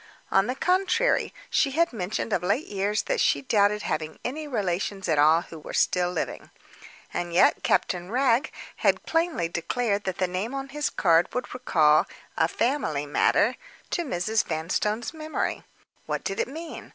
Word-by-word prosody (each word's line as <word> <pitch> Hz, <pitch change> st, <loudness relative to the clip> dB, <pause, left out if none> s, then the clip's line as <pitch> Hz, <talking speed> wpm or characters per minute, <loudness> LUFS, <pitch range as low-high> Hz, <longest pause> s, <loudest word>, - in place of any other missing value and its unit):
On 195 Hz, +1 st, +4 dB
the 250 Hz, -, -2 dB
contrary 375 Hz, -, +2 dB, 0.2 s
she 275 Hz, -3 st, +2 dB
had 335 Hz, -4 st, +3 dB
mentioned 210 Hz, +1 st, -3 dB
of -, -, +1 dB
late 205 Hz, -, 0 dB
years 205 Hz, +1 st, -1 dB
that -, -, 0 dB
she -, -, +2 dB
doubted 210 Hz, -4 st, +2 dB
having 155 Hz, 0 st, -3 dB
any 300 Hz, +5 st, -3 dB
relations 195 Hz, -5 st, -2 dB
at 155 Hz, -3 st, +2 dB
all 155 Hz, +3 st, +5 dB
who 165 Hz, -, -11 dB
were -, -, -7 dB
still 180 Hz, -1 st, +2 dB
living. 175 Hz, -, -4 dB, 0.6 s
And 175 Hz, 0 st, -3 dB
yet -, -, +5 dB
Captain 180 Hz, 0 st, 0 dB
Wragge 255 Hz, +2 st, +2 dB, 0.3 s
had -, -, +1 dB
plainly 330 Hz, -, 0 dB
declared 200 Hz, +5 st, -1 dB
that 190 Hz, -2 st, -2 dB
the 185 Hz, -, +1 dB
name 190 Hz, +8 st, -3 dB
on 270 Hz, 0 st, -5 dB
his 295 Hz, +2 st, -1 dB
card 170 Hz, -1 st, +3 dB
would 250 Hz, -, -3 dB
recall 155 Hz, -11 st, +3 dB, 0.3 s
"a 160 Hz, -, +3 dB
family 170 Hz, -, -1 dB
matter" 145 Hz, -, +2 dB, 0.3 s
to -, -, 0 dB
Mrs. 215 Hz, -, 0 dB
Vanstone's 195 Hz, -, -2 dB
memory. 310 Hz, 0 st, -3 dB, 0.5 s
What -, -, -2 dB
did 195 Hz, -, -3 dB
it -, -, +1 dB
mean? 320 Hz, +5 st, -8 dB
205 Hz, 165 wpm, -26 LUFS, 175-270 Hz, 0.6 s, all